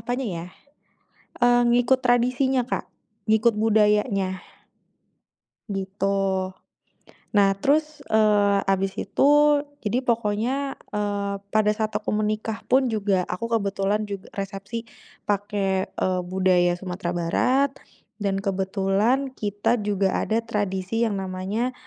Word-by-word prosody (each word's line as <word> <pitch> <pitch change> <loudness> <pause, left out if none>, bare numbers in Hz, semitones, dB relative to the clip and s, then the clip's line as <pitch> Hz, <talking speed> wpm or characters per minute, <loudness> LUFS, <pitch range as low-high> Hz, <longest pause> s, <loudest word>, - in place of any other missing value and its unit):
apanya 245 +3 -3
ya, 165 - -5 1.0
eee, 245 0 +5
ngikut 245 +2 +3
tradisinya, 250 +2 +2
Kak, - - -1 0.4
ngikut 220 +2 +4
budayanya. 210 -2 +3 1.4
Gitu. 195 0 -1 1.2
Nah 200 -1 +5
terus, 305 +4 +1
eee, 210 -2 +4
abis 195 0 0
itu, 200 - -1 0.6
jadi 220 +3 0
pokoknya, 235 +4 -1 0.2
eee, 205 -1 -1 0.2
pada 215 -1 +3
saat 215 0 -1
aku 210 0 -3
menikah 215 +1 -1
pun 265 +1 +4
juga, 200 -4 +1
aku 230 +6 -4
kebetulan 200 +1 -1
jug 200 -2 -5
resepsi 200 +3 -5 0.4
pake, 200 -2 -1
eee, 185 -1 0
budaya 180 -1 +2
Sumatera 180 -1 -4
Barat. 250 +11 +1 0.5
Dan 200 -2 -1
kebetulan 195 +7 0
kita 205 +2 0
juga 200 -2 0
ada 220 +1 +1
tradisi 205 0 -1
yang 215 -4 0
namanya, 190 +6 -2
205 Hz, 110 wpm, -24 LUFS, 195-230 Hz, 1.4 s, eee